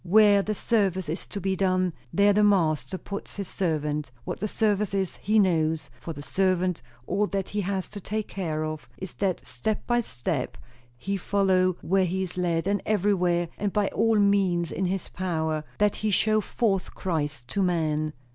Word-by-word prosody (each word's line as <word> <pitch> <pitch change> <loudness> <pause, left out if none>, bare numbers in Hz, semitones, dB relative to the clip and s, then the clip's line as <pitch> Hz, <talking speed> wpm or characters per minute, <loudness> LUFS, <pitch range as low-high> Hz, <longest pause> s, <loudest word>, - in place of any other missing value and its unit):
Where 205 +2 +6
the 215 +2 -2
service 195 -5 +1
is 165 - -4
to 205 - -5
be 190 0 0
done, 185 -2 +1 0.2
there 200 +1 +4
the 210 +1 +4
Master 165 -6 +2
puts 200 +2 -7
his 200 -2 -4
servant; 150 -6 -1 0.2
what - - -4
the 210 - -1
service 210 -2 +1
is, 190 -2 -1
he 215 +2 +1
knows; 160 -7 +2
for 165 - -6
the 145 -2 -7
servant, 185 0 +1 0.2
all 200 +7 +1
that 195 -1 -2
he 205 - -1
has 190 -1 -2
to 210 - -7
take 215 +3 -3
care 155 -5 -2
of 155 -1 -6
is, 190 -2 -7
that 190 -3 -1
step 215 -1 -3
by 240 0 +2
step 130 - -3 0.4
he 195 +10 -2
follow 185 -1 +2
where 190 +1 +3
he 190 +2 -1
is 180 - -6
led, 170 -2 0
and 200 +1 +1
everywhere, 180 -5 +1
and 205 -1 0
by 210 -2 +2
all 225 0 +2
means 195 -4 +2
in 190 - -1
his 185 0 -2
power, 160 -4 -2
that 210 -1 +2
he 215 - -1
show 215 +2 +3
forth 200 -3 -1
Christ 145 -8 -2
to 200 - -1
men. 155 -4 0
190 Hz, 185 wpm, -26 LUFS, 165-200 Hz, 0.4 s, Where